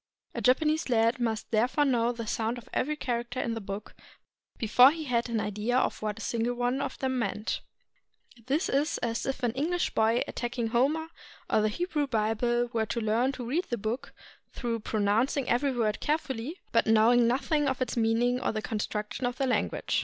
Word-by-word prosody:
A - - -4
Japanese 305 +4 +2
lad 230 0 +3
must 225 -3 -2
therefore 245 +7 +2
know 240 -3 +2
the 230 -1 -6
sound 225 +2 -1
of 240 - -11
every 300 +4 0
character 245 -2 -3
in 235 - -1
the 225 - -4
book 200 +1 -6 0.6
before 245 +3 +6
he 320 +2 -4
had 240 -4 0
an 230 -1 0
idea 210 +4 -1
of - - 0
what 210 -1 -2
a - - -8
single 235 +1 -1
one 245 +3 0
of - - -4
them 260 -1 -1
meant. 210 -1 -2 0.9
This 295 +7 +1
is 285 +3 +1
as 230 +1 -1
if 265 -1 -3
an 240 - +2
English 330 +8 -1
boy 225 +2 +2
attacking 240 -1 -3
Homer 290 +7 +1 0.4
or - - +4
the 215 - +2
Hebrew 300 - -1
Bible 235 +1 0
were 220 -1 0
to 235 - -2
learn 230 +4 +1
to 250 -2 -6
read 315 +10 0
the 240 - -3
book 220 +5 -4 0.4
through, 235 -2 -3
pronouncing 220 +6 +1
every 270 +4 +2
word 225 -4 0
carefully, 300 0 -2
but 230 - +3
knowing 230 +2 +5
nothing 290 +4 +1
of 265 -1 -1
its 255 - -2
mean 225 0 +2
ing 245 +1 +1
or - - 0
the 215 -1 -4
construction 210 +2 -3
of 245 +1 -4
the 270 - +1
language. 255 - 0
240 Hz, 195 wpm, -28 LUFS, 225-265 Hz, 0.9 s, before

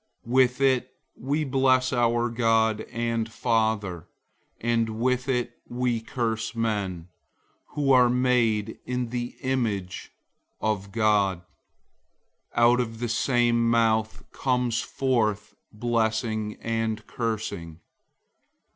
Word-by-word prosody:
003:009 120 - -6
With 130 0 +3
it 130 -2 +2 0.2
we 145 +4 -1
bless 130 -2 +2
our 120 -1 +2
God 115 -2 +2
and 115 -1 -2
Father, 110 -7 0 0.5
and 115 -1 0
with 125 +2 0
it 120 -2 -1
we 120 -2 -1
curse 115 -1 -3
men, 100 -7 -2 0.7
who 140 -2 +2
are 125 -2 +6
made 120 -4 +1
in 125 -1 -2
the 120 0 -4
image 110 -8 -2 0.5
of 100 -2 -2
God. 100 -4 +2 1.2
003:010 120 - +4
Out 120 +1 +5
of 115 -2 -3
the 120 0 -2
same 120 0 +2
mouth 110 -1 +1
comes 125 -3 0
forth 110 -5 -1 0.2
blessing 110 -1 -1
and 115 -1 -2
cursing. 105 -8 -4
115 Hz, 110 wpm, -26 LUFS, 110-125 Hz, 1.2 s, are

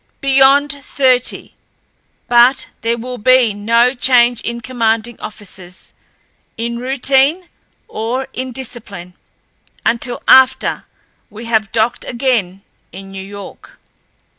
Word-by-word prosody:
"Beyond 275 +1 +3
thirty. 260 -3 0 0.7
But 245 +2 +4 0.2
there 230 +1 -1
will 250 +2 -7
be 255 -1 +3
no 230 +4 +2
change 245 -2 +3
in 235 0 -4
commanding 230 -1 -2
officers, 185 -3 -11 0.6
in 235 +1 -4
routine 270 +6 +1 0.4
or 245 +5 -4
in 255 0 -5
discipline, 225 -8 -8 0.7
until 240 +1 -1
after 265 0 +4 0.4
we 220 +2 -10
have 220 -3 0
docked 230 +2 0
again 230 -7 -2 0.3
in 195 +2 -11
New 195 0 -7
York." 200 0 -12
240 Hz, 105 wpm, -16 LUFS, 220-260 Hz, 0.7 s, But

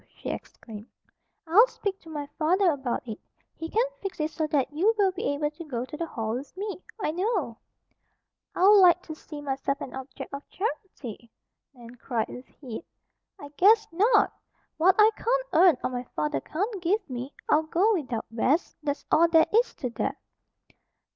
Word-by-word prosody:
she - - -5
exclaimed. 215 -1 -9 0.6
"I'll 395 +9 +6
speak 400 -5 -4
to 325 - -15
my 295 -2 -5
father 355 +3 +3
about 265 -4 -3
it. 220 -1 -6 0.4
He 325 - -6
can 455 +6 +2 0.2
fix 390 -3 -5
it 305 +1 -1
so 310 0 -2
that 285 -2 0
you 400 +9 +2
will 395 -2 +3
be 365 - -2
able 295 +1 -1
to 310 +3 -9
go 250 -6 -4
to 300 - -9
the 335 +2 -3
Hall 220 -6 -3
with 270 +8 -6
me, 400 -1 -5 0.2
I 350 - 0
know." 360 - -1 1.0
"I'd 365 - +3
like 380 -3 +7
to 315 - -7
see 305 -1 -10
myself 275 0 -2
an 270 - -7
object 265 +1 -8
of 280 - -4
charity!" 295 - -5 0.5
Nan 240 -1 -12
cried, 230 -2 -2
with 250 - -9
heat. 255 +1 -9 0.6
"I, 285 - -9
guess, 430 +3 +5
not! 415 +5 +3 0.4
What 360 +4 +5
I 430 +1 +7
can't - - 0
earn, 340 -3 +6
or - - -1
my 250 0 -4
father 150 -3 -1
can't 395 - -3
give 385 +6 0
me, 255 +2 -6
I'll 305 - +4
go 355 +8 +2
without, 255 - -2
Bess. 265 +9 +1
That's 290 -1 -3
all 335 +2 +6
there 325 -1 +5
is 470 +3 +3
to 250 -3 -4
that!" - - -2
315 Hz, 180 wpm, -27 LUFS, 265-380 Hz, 1.0 s, like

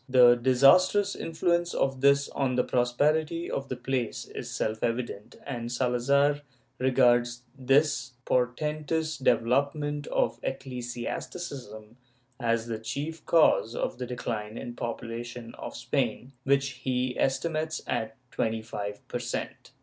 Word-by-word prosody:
The 125 -1 +8
disastrous 135 +11 +5
influence 175 +1 0
of 135 -1 0
this 140 0 +5
on 135 -2 -1
the 125 - +3
prosperity 155 +7 +1
of 135 0 -3
the 130 - -2
place 125 -1 -2
is - - -7
self 110 0 -2
evident 115 -3 -3
and 120 -4 -4
Salazar 140 +4 +2 0.4
regards 120 -2 +3
this 135 -1 +2
portentous 150 +5 0
development 140 +5 +1
of - - 0
ecclesiasticism 125 -2 -5 0.4
as 115 -2 +1
the 115 -2 -4
chief 145 +8 -4
cause 155 -8 +4
of 120 - -2
the 125 - -3
decline 115 -3 -4
in - - -5
the 120 - -8
population 115 0 -5
of - - -7
Spain, 130 +3 -1
which 140 0 +3
he 125 -1 0
estimates 155 +3 0
at 110 0 -2
twenty 110 0 -1
five 105 -2 -6
per 120 - -3
cent. 120 -1 -5
125 Hz, 125 wpm, -28 LUFS, 120-145 Hz, 0.4 s, The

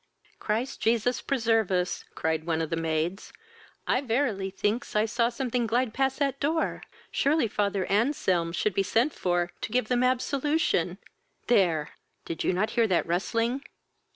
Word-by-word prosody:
"Christ 225 +5 -2
Jesus 235 +2 +1
preserve 225 -5 +1
us! 180 -1 -1
(cried 160 +1 -1
on 160 -1 +1
of 160 - -5
the - - +1
maids,) 165 +3 -2 0.5
I 255 - +2
verily 225 -6 0
thinks 210 +5 -2
I 210 +1 +4
saw 235 +1 +1
something 245 -1 -1
glide 235 +1 +1
past 270 0 0
that 275 -2 0
door! 315 +3 0 0.3
Surely 285 -2 +2
father 200 -2 0
Anselm 195 - +1
should 190 +4 0
be 195 - +2
sent 230 +9 +1
for 175 -1 0
to - - -4
give 245 -2 0
them 250 -1 +2
absolution: 280 +5 +1 0.5
There! 175 -10 +2 0.4
did 165 - -4
you - - +2
not 200 +5 0
hear 235 -1 +3
that 185 -4 +2
rustling?" 230 +9 0
225 Hz, 155 wpm, -27 LUFS, 185-255 Hz, 0.5 s, I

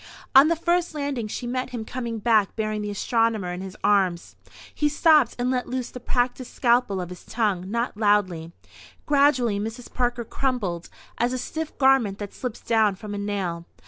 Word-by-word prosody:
On 270 +2 +8
the 335 - +2
first 345 0 0
landing 280 -6 -2
she 240 - -5
met 255 +1 -2
him 235 -3 -5
coming 235 -1 -4
back 215 -2 +2
bearing 215 -1 -2
the 210 - -3
astronomer 220 -3 0
in 180 - -6
his 190 -1 -8
arms. 190 -4 +1 0.4
He 295 - +1
stopped 300 -4 +4
and 250 +1 0
let 250 -1 -1
loose 255 -1 -3
the 250 - -8
practised 245 +1 -2
scalpel 235 -5 +2
of 180 -1 -5
his 180 - -10
tongue, 200 -5 -1
not 235 +3 -2
loudly. 200 -6 +1 0.5
Gradually 270 -7 +3
Mrs. 225 +4 -6
Parker 240 -1 -1
crumpled 210 -11 -2 0.3
as 240 +2 +1
a - - -1
stiff 315 +5 -5
garment 265 -7 +3
that 205 -1 -7
slips 250 -3 -5
down 220 -3 +2
from 210 +1 -8
a 205 - -3
nail. 190 -5 -3
230 Hz, 180 wpm, -24 LUFS, 205-255 Hz, 0.5 s, On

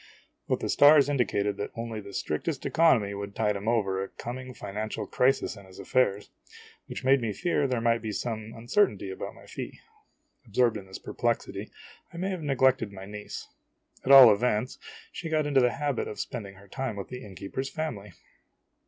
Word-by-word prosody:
But - - 0
the - - -2
stars 145 0 +7
indicated 105 -7 0
that 100 - -3
only 115 -2 -4
the 100 0 -10
strictest 130 - -3
economy 130 -12 +3
would 100 0 -6
tide 105 -2 +1
him 100 +2 -5
over 95 -5 +1
a - - -5
coming 130 +1 -7
financial 110 -2 -5
o - - -6
crisis 130 -3 +1
in 100 -2 -13
his 95 - -15
affairs 100 0 0 0.6
which - - -6
made 135 0 +4
me 115 -2 -1
fear 145 - 0
there 125 -2 0
might 115 0 +2
be 110 -1 -4
some 110 0 -4
uncertainty 115 - +1
about 95 - -6
my - - -15
fee. - - -7 0.7
Absorbed 120 -3 +2
in 95 -2 -10
this 95 - -7
perplexity, - - -2 0.4
I 170 - -10
may 190 +3 -1
have 185 -3 -4
neglected 130 -6 +2
my 95 -1 -9
niece; 105 +1 -8 0.6
at 135 - +1
all 130 -5 +11
events, 120 +3 -1 0.3
she 165 - -6
got 155 -1 +1
into 140 -2 +3
the 125 -1 +3
habit 145 -3 -1
of 105 - -7
spending 100 -3 -5
her 100 +1 -16
time 130 +1 -4
with 100 - -6
the 125 0 -7
innkeeper's 100 +7 -5
family. 115 - -5
115 Hz, 190 wpm, -28 LUFS, 100-135 Hz, 0.7 s, all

